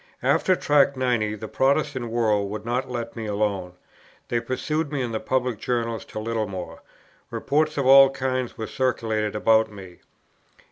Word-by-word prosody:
After 185 - +3
Tract 140 -4 +3
90 120 -5 0
the 110 +1 -7
Protestant 135 -2 0
world 110 -4 +1
would 105 +1 -6
not 125 +3 -2
let 120 -2 -5
me 115 -2 -5
alone; 100 -3 -1 0.6
they 120 - +1
pursued 150 +5 -2
me 145 - -2
in 120 - -3
the 110 - -2
public 125 -1 -1
journals 115 -2 -2
to - - -10
Littlemore. 110 -5 -4 0.5
Reports 155 +2 0
of 140 - 0
all 135 +1 +8
kinds 130 -2 -3
were 110 - -3
circulated 110 -4 -1
about 110 0 +3
me. 95 -4 -12
115 Hz, 155 wpm, -24 LUFS, 110-130 Hz, 0.6 s, all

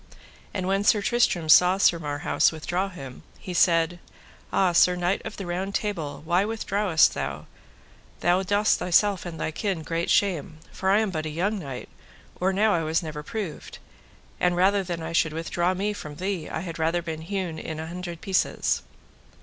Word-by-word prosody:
And 185 -2 -3
when 195 +1 +1
Sir 210 0 +4
Tristram 195 -9 +1
saw 180 +4 +7
Sir 175 -3 +4
Marhaus 145 -2 +1
withdraw 175 +4 -2
him, 135 -8 -10 0.2
he 185 - -7
said: 170 0 +3 0.5
Ah! 190 -2 +3
Sir 180 +1 +5
Knight 180 +2 0
of - - -7
the 195 - -5
Round 185 +3 -3
Table, 160 -10 -3
why 175 +3 +2
withdrawest 205 -5 +2
thou - - -4
thee? - - -18 0.8
thou 175 +2 +3
dost 205 +2 +2
thyself 190 +1 +2
and 165 -2 -7
thy 160 - -2
kin 185 -1 -2
great 165 +2 -2
shame, 170 -6 +1
for 190 - -2
I 205 +3 +5
am 215 -3 -1
but 155 -2 -3
a - - -3
young 195 +7 -1
knight, 135 -7 -7 0.5
or 185 +2 +2
now 210 +2 +3
I 170 - +1
was 160 +2 0
never 155 -2 -5
proved, 190 0 -6 0.6
and 180 0 +2
rather 195 +3 +3
than 175 -3 -4
I 160 - -4
should 160 -2 +2
withdraw 175 +3 -1
me 205 +3 -1
from 150 -7 -8
thee, 185 -1 -3
I 160 - -3
had 165 -2 -6
rather 165 +2 +1
be 160 -2 -4
hewn 175 0 -4
in 160 -1 -6
an 160 - -5
hundred 175 -1 -6
pieces. 190 -1 0
175 Hz, 190 wpm, -25 LUFS, 160-195 Hz, 0.8 s, saw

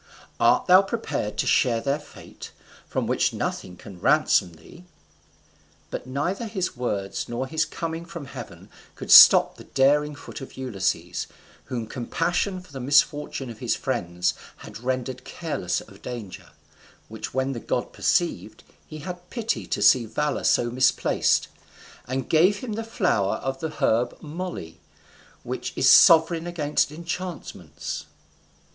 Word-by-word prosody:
art - - +4
thou 185 +1 +7
prepared 195 - -3
to - - 0
share 120 -4 +3
their 140 +4 -1
fate, 150 - -12 0.4
from - - -2
which - - +1
nothing 90 -1 -4
can 95 -3 -12
ransom 90 0 +3
thee?" 85 - -15 1.1
But - - -5
neither 175 - -2
his 190 -7 -3
words 100 -6 -3
nor 120 +2 -2
his 160 +3 0
coming 165 +1 -5
from 170 -3 -8
heaven 125 - -10 0.2
could - - -6
stop - - +9
the - - -11
daring 145 +2 +2
foot 145 - -10
of 135 - -10
Ulysses, 115 -9 -2 0.4
whom 120 -3 -4
compassion 175 - -2
for 180 - -18
the 135 - -6
misfortune 145 -1 +1
of 115 - -12
his - - 0
friends 85 +1 -1 0.3
had - - -10
rendered 130 +1 -3
careless 155 - -3
of - - -16
danger: 115 -7 -8 0.6
which 110 +2 -8
when 130 +1 0
the 125 - -4
god - - -3
perceived, - - -1 0.2
he 155 - -9
had 180 +1 -8
pity 230 -2 -3
to - - -1
see 120 -3 +5
valour 150 +5 -2
so 120 - +2
misplaced, 130 +1 +2 0.6
and 130 0 -3
gave 180 +6 +3
him 245 -5 -5
the 225 +2 -3
flower 180 - 0
of 135 0 -4
the 160 - -3
herb 120 -5 0
moly, 160 - -7 0.6
which - - -5
is - - +2
sovereign 165 +1 +6
against 150 -4 0
enchantments. 160 - -6
140 Hz, 145 wpm, -24 LUFS, 120-170 Hz, 1.1 s, stop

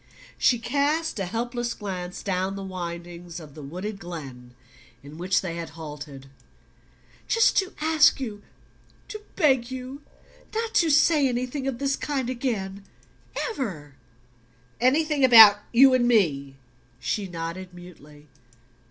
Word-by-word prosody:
She 245 - +4
cast 290 +4 -1
a 190 - -2
helpless 240 +3 -3
glance 185 -3 -6
down 190 0 -1
the 195 - -6
windings 175 -1 -7
of 150 -4 -12
the 155 - -10
wooded 185 +8 -6
glen 135 -9 -9 0.5
in 145 +3 -12
which 185 +2 +1
they 170 -3 -5
had 170 -1 -6
halted. 145 -3 -9 1.0
"Just 455 0 +3
to 380 -2 +1
ask 310 -2 +4
you 215 -6 -6 0.7
to 430 0 -7
beg 265 -8 +2
you 260 +2 -7 0.5
not 455 0 -2
to 335 - +3
say 300 -1 +4
anything 255 +3 -3
of 265 -3 -2
this 275 0 0
kind 265 -4 -3
again 205 -6 -3 0.7
EVER 180 - -5 0.5
" 115 - -30
"Anything 305 -1 0
about 220 -5 +9
you 260 +2 +6
and 245 -1 +3
me?" 145 - +1 0.4
She 205 -2 -2
nodded 170 +2 -6
mutely. 150 -4 -15
200 Hz, 135 wpm, -25 LUFS, 170-265 Hz, 1.0 s, about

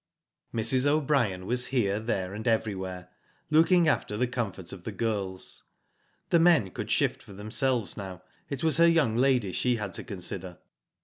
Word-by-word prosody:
Mrs. 120 +4 +2
O'Brien 135 -11 +1
was 125 +3 -1
here, 105 -6 +1
there, 100 -4 -2
and 110 +2 -5
everywhere, 95 -5 -1 0.4
looking 165 +2 +5
after 105 -8 0
the 125 - +2
comfort 110 -8 -4
of 90 -3 -10
the 110 - -4
girls. 100 -3 -2 0.7
The 170 - +5
men 165 - +4
could - - -6
shift - - +1
for 100 - -13
themselves 110 +3 -1
now, 95 -2 -8 0.3
it 140 0 -4
was 160 -3 +2
her 170 0 +6
young 150 -10 +3
lady 125 -5 +2
she 125 +6 +1
had 105 -4 -4
to - - -5
consider. 95 -4 -6
110 Hz, 165 wpm, -28 LUFS, 95-135 Hz, 0.7 s, her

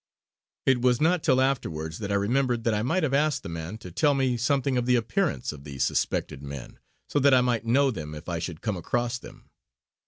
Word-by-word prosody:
It 130 -2 +3
was 125 -1 +3
not 170 +2 +3
till 130 -4 +3
afterwards 80 - -1
that 100 -2 -4
I - - +2
remembered 120 +3 +1
that 115 - +1
I 105 - 0
might 160 +10 0
have 140 -4 0
asked 150 +1 +2
the - - -6
man 85 +5 -5
to 90 -5 -10
tell 145 - +2
me 130 -2 +1
something 135 +2 +1
of 125 -1 0
the 125 - +4
appearance 130 - 0
of 70 -2 -12
the 70 -2 -8
suspected 70 +1 -1
men, 70 -2 -8 0.3
so 145 - +1
that 140 -1 +5
I 125 - +5
might 120 -2 0
know 135 +3 +4
them 75 -8 -6
if 75 +2 -10
I 85 -2 -2
should 85 -2 -5
come 105 -4 -2
across 120 +7 -1
them. - - -14
120 Hz, 225 wpm, -26 LUFS, 90-135 Hz, 0.3 s, that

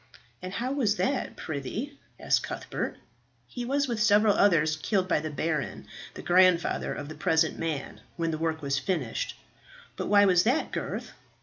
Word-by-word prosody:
"And 185 +1 -6
how 250 +5 -2
was 245 -7 +1
that, 265 +4 -1
prithee?" 210 - -5 0.2
asked - - +2
Cuthbert. - - -4 0.5
"He 245 -1 -6
was, 280 +3 +1
with 235 -4 -2
several 210 -1 +5
others, 160 -7 +3
killed 185 +3 0
by 180 - +2
the 155 +1 -4
baron, 155 +1 -2 0.3
the - - -8
grandfather 180 -1 +3
of 145 - -5
the 155 - -7
present 160 +1 +1
man, 160 -4 -4
when 165 -1 -1
the 155 - -3
work 160 -1 -2
was 140 -1 0
finished." 150 - -2 0.6
"But - - -4
why 205 0 +6
was 180 -3 +5
that, 250 - +1
Gurth?" - - -4
180 Hz, 170 wpm, -28 LUFS, 155-215 Hz, 0.6 s, why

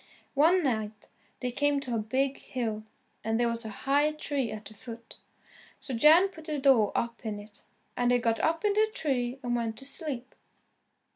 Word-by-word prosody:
One 330 +6 +4
night 220 -5 -2 0.3
they 250 -1 -1
came 290 +3 +1
to 255 -3 -4
a 230 - +1
big 265 +6 0
hill, 220 -4 -4 0.4
and 225 +1 0
there 240 - +3
was 230 0 0
a - - -4 0.2
high 290 +3 +3
tree 285 -6 -2
at 215 0 -7
the 215 - -10
foot. 230 +1 -10 0.6
So 265 - -6
Jan 315 +10 +6
put 320 -4 -13
the 305 -2 -2
door 265 -7 +4
up 235 0 -2
in 215 -2 -3
it, 205 0 -12 0.3
and 245 0 +1
they 245 - +5
got 230 -1 0
up 330 +5 +1
in 410 - +3
the 435 +1 +3
tree 255 - -1
and 240 -1 0
went 230 -2 -2
to 270 - -7
sleep. 270 -4 -5
245 Hz, 195 wpm, -29 LUFS, 225-290 Hz, 0.6 s, Jan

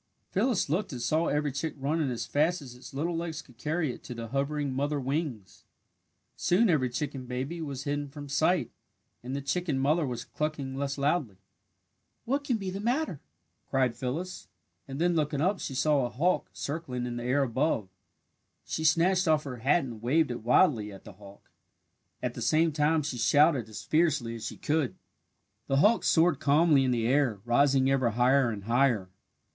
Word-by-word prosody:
Phyllis 245 -7 +1
looked 180 +7 -1
and 125 - -5
saw 155 +8 +1
every 150 0 0
chick 145 +4 -3
running 145 +2 0
as 120 -2 -3
fast 160 +5 +1
as 135 -5 -10
its 125 - -12
little 165 +5 -2
legs 165 -1 -4
could 125 -3 -21
carry 150 0 -1
it - - -13
to 125 - -7
the 115 -1 -6
hovering 140 +1 -1
mother 145 +2 -1
wings. 135 - -4 0.7
Soon 195 +3 +3
every 130 -6 +2
chicken 135 0 -4
baby 135 +7 -4
was 140 -4 -5
hidden 145 0 -2
from 145 +1 -9
sight 160 +5 +1 0.5
and 130 +3 -5
the 140 - -4
chicken 155 0 -1
mother 150 +5 +2
was 125 -4 -4
clucking 150 -3 -3
less 140 0 -2
loudly. 140 - 0 0.9
"What 275 +4 0
can 255 -5 0
be 195 -3 -4
the 195 - -5
matter?" 240 - -1 0.5
cried 130 -3 +1
Phyllis, 165 +9 -4 0.4
and 135 +1 -6
then 175 +1 +2
looking 150 -3 0
up 190 +6 +1
she 135 - -5
saw 145 0 +2
a 120 - -1
hawk 175 +9 0
circling 140 -5 -4
in 120 -1 -4
the 120 - -4
air 130 +3 +2
above. 130 -4 0 0.8
She 160 - -3
snatched 175 +4 +3
off 155 -1 +3
her 130 -3 -6
hat 140 +8 +2
and 115 -5 -7
waved 145 +4 +2
it 120 - -5
wildly 120 - +3
at 95 - -12
the - - -11
hawk. 100 +1 -16 0.7
At 125 -1 -1
the 120 - -7
same 160 +7 +3
time 150 +1 +2
she 140 -4 -4
shouted 140 -1 +3
as 110 - -8
fiercely 150 -8 +1
as 115 -1 -5
she - - -7
could. 150 -4 0 0.7
The 135 - +1
hawk 210 +10 +4
soared 165 -3 +3
calmly 150 -1 +4
in 130 - +1
the 120 -2 0
air, 130 -4 +2
rising 135 +2 +3
ever 130 -3 +2
higher 125 +3 +3
and 105 -3 -5
higher. 115 -4 +1
140 Hz, 185 wpm, -29 LUFS, 125-160 Hz, 0.9 s, hawk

